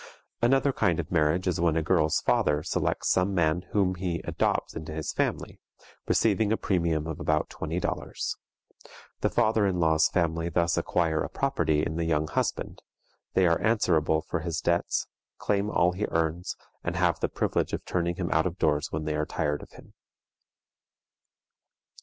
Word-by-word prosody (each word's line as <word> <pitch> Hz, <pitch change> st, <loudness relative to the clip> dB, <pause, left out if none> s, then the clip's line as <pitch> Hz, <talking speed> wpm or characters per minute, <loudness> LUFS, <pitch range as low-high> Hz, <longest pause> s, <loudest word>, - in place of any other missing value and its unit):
Another 135 Hz, +3 st, +3 dB
kind 90 Hz, -8 st, +1 dB
of 80 Hz, -, -4 dB
marriage 85 Hz, +2 st, +2 dB
is 85 Hz, -2 st, 0 dB
when 85 Hz, -2 st, +2 dB
a 80 Hz, -, +1 dB
girl's 80 Hz, -2 st, +2 dB
father 75 Hz, 0 st, +2 dB
selects 85 Hz, -, -1 dB
some 95 Hz, +1 st, +2 dB
man 85 Hz, +1 st, +1 dB
whom 95 Hz, -3 st, +2 dB
he 90 Hz, -2 st, -3 dB
adopts -, -, -1 dB
into 80 Hz, 0 st, -6 dB
his 80 Hz, 0 st, -4 dB
family, -, -, -2 dB, 0.5 s
receiving 110 Hz, -1 st, +2 dB
a 110 Hz, -, +2 dB
premium 85 Hz, -5 st, 0 dB
of 80 Hz, -2 st, -5 dB
about 75 Hz, -1 st, 0 dB
twenty 80 Hz, +3 st, -3 dB
dollars. -, -, -3 dB, 0.8 s
The -, -, +1 dB
father 110 Hz, -1 st, +2 dB
in 90 Hz, -2 st, -1 dB
law's 80 Hz, -1 st, +4 dB
family 85 Hz, -1 st, 0 dB
thus 85 Hz, 0 st, +1 dB
acquire 80 Hz, -3 st, 0 dB
a -, -, -4 dB
property 80 Hz, -, 0 dB
in 80 Hz, -, -3 dB
the 85 Hz, -, -1 dB
young 80 Hz, -1 st, +1 dB
husband; -, -, -2 dB, 0.5 s
they 95 Hz, -, +4 dB
are 85 Hz, -1 st, +2 dB
answerable 80 Hz, -8 st, +2 dB
for 85 Hz, -, -3 dB
his 85 Hz, 0 st, -3 dB
debts, 85 Hz, 0 st, 0 dB, 0.3 s
claim 100 Hz, 0 st, 0 dB
all 90 Hz, -3 st, +3 dB
he 95 Hz, +4 st, -2 dB
earns, 80 Hz, +2 st, -1 dB, 0.3 s
and -, -, -2 dB
have -, -, +2 dB
the -, -, 0 dB
privilege -, -, -1 dB
of -, -, -4 dB
turning 85 Hz, -1 st, -1 dB
him 90 Hz, -1 st, -3 dB
out 80 Hz, +3 st, +3 dB
of 90 Hz, +1 st, -6 dB
doors 75 Hz, -4 st, +1 dB
when 75 Hz, 0 st, -3 dB
they 75 Hz, -, -1 dB
are 75 Hz, 0 st, -1 dB
tired 75 Hz, 0 st, -1 dB
of -, -, -12 dB
him. -, -, -15 dB
85 Hz, 175 wpm, -27 LUFS, 80-90 Hz, 0.8 s, law's